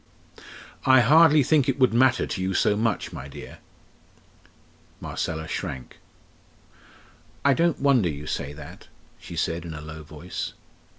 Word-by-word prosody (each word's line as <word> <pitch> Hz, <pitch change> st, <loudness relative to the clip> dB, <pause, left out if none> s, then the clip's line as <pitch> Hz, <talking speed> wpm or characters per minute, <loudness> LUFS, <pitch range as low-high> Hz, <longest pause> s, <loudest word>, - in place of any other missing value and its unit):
"I 130 Hz, -1 st, +6 dB
hardly 155 Hz, +4 st, +6 dB
think 140 Hz, -1 st, +2 dB
it 135 Hz, -, 0 dB
would 130 Hz, -3 st, +3 dB
matter 125 Hz, +1 st, +3 dB
to 95 Hz, -, -4 dB
you 95 Hz, 0 st, -1 dB
so 105 Hz, -, +3 dB
much, 110 Hz, +1 st, -1 dB
my -, -, -7 dB
dear." 70 Hz, -, -11 dB, 1.4 s
Marcella 80 Hz, -1 st, -4 dB
shrank. 65 Hz, -4 st, -6 dB, 1.5 s
"I 140 Hz, -, +6 dB
don't 170 Hz, +2 st, +1 dB
wonder 130 Hz, -10 st, +3 dB
you 75 Hz, -1 st, -6 dB
say 70 Hz, -1 st, -3 dB
that!" 75 Hz, 0 st, -12 dB, 0.3 s
she -, -, -10 dB
said 85 Hz, +1 st, -2 dB
in 80 Hz, -2 st, -7 dB
a -, -, -7 dB
low 75 Hz, +1 st, -9 dB
voice. 80 Hz, +4 st, -7 dB
105 Hz, 140 wpm, -25 LUFS, -, 1.5 s, I